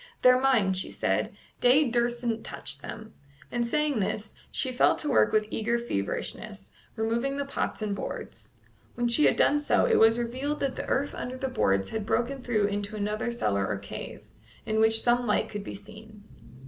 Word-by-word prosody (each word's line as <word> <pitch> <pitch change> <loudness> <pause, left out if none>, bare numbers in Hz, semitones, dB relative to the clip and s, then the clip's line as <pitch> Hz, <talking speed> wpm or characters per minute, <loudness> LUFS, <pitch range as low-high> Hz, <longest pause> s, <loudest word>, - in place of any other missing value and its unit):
"They're 255 0 +6
mine," 235 -8 +3
she 185 - -2
said. - - -1 0.2
"Day 265 +4 +5
dursn't 240 -1 0
touch - - -3
them;" 220 0 -9 0.4
and 240 -1 0
saying 295 0 +1
this, 210 +2 -3 0.2
she 260 - 0
fell 250 - +4
to 300 - -5
work 255 -6 +4
with 215 0 +2
eager 235 +2 0
feverishness, 205 - -4 0.2
removing 235 +5 -1
the 280 - -2
pots 275 -5 -3
and 205 -2 -1
boards. - - -7 0.5
When 240 0 0
she 235 +6 +4
had - - +4
done 295 - +3
so, 290 - +2
it 475 - +3
was 225 +1 +6
revealed 260 +5 -2
that 275 -2 -1
the - - -5
earth 280 +2 0
under 255 +1 -5
the 265 0 -2
boards 95 - +1
had 220 -2 -3
broken 260 +4 0
through 225 -4 +1
into 205 +1 -3
another 210 +3 -2
cellar 100 - 0
or 105 - -2
cave, 100 0 -8 0.4
in 220 0 0
which 220 0 +3
some 245 0 +2
light 215 +1 +1
could 205 -1 -5
be - - -7
seen. 215 +1 -13
235 Hz, 185 wpm, -27 LUFS, 210-255 Hz, 0.5 s, They're